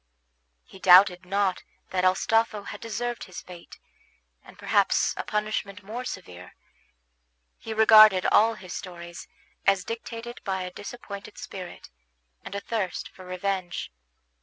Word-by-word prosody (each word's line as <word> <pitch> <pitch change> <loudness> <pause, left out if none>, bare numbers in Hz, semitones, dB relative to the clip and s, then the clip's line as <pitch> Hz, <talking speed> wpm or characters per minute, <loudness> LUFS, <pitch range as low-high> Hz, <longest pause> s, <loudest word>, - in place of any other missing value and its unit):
He 190 - -15
doubted 180 -1 +6
not 195 -1 0 0.3
that 185 -1 0
Astolpho 210 +3 +2
had - - -8
deserved 240 +1 -4
his 185 - -9
fate, 175 -2 -13 0.7
and - - -16
perhaps - - +2
a - - -3
punishment 210 -1 -3
more 230 +5 -6
severe; 90 - -8 1.0
he 225 - -8
regarded 215 -3 +7
all 225 +1 +5
his 185 -3 -9
stories 170 -2 -8 0.4
as 195 -1 +4
dictated 230 +1 -7
by 190 -2 -2
a 180 - -6
disappointed 205 0 -9
spirit, 185 -3 -9 0.5
and 200 - -8
a - - -1
thirst 205 -4 -3
for 185 - -14
revenge. 185 - -3
195 Hz, 130 wpm, -26 LUFS, 185-220 Hz, 1.0 s, regarded